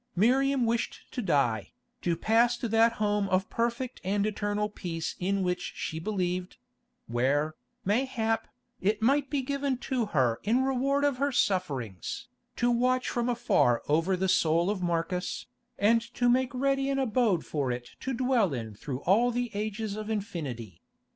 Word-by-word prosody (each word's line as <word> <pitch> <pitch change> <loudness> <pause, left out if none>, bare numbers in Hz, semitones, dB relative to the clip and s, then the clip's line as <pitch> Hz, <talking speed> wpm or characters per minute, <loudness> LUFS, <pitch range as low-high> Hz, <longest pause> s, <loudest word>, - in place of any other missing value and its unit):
Miriam 260 +6 +3
wished 230 0 -1
to 250 - -3
die, 130 - +1 0.3
to 170 -2 0
pass 235 +5 +3
to 240 - -3
that 225 +1 +4
home 205 -2 0
of 185 +1 +1
perfect 235 +2 -2
and 200 +2 +1
eternal 210 0 -1
peace 170 -6 -4
in 195 +1 0
which 180 0 -2
she 160 - -4
believed; 180 -1 -2 0.5
where, 140 +6 +1 0.3
mayhap, 225 0 0 0.3
it 210 +3 0
might 275 +3 +3
be 285 -2 0
given 280 0 -1
to 250 -3 -1
her 130 - +1
in 240 +6 +2
reward 270 +2 +1
of 285 -3 +2
her 280 +2 +1
sufferings, 140 - -1 0.3
to 240 0 +2
watch 255 +2 +2
from 240 0 -1
afar 235 - +2
over 165 +5 +2
the 190 +1 0
soul 170 +1 +3
of 200 -3 -3
Marcus, 175 +1 -1 0.3
and 230 +3 +4
to 245 - +2
make 255 +2 +3
ready 275 +1 +1
an 275 - 0
abode 230 -8 +1
for 140 -4 -1
it 120 0 -5
to 265 - -3
dwell 240 - +2
in 110 -3 -5
through 130 +5 -6
all 220 +7 +4
the 245 -1 -2
ages 210 0 -3
of 215 0 -5
infinity. 145 - -4
210 Hz, 160 wpm, -29 LUFS, 170-245 Hz, 0.5 s, that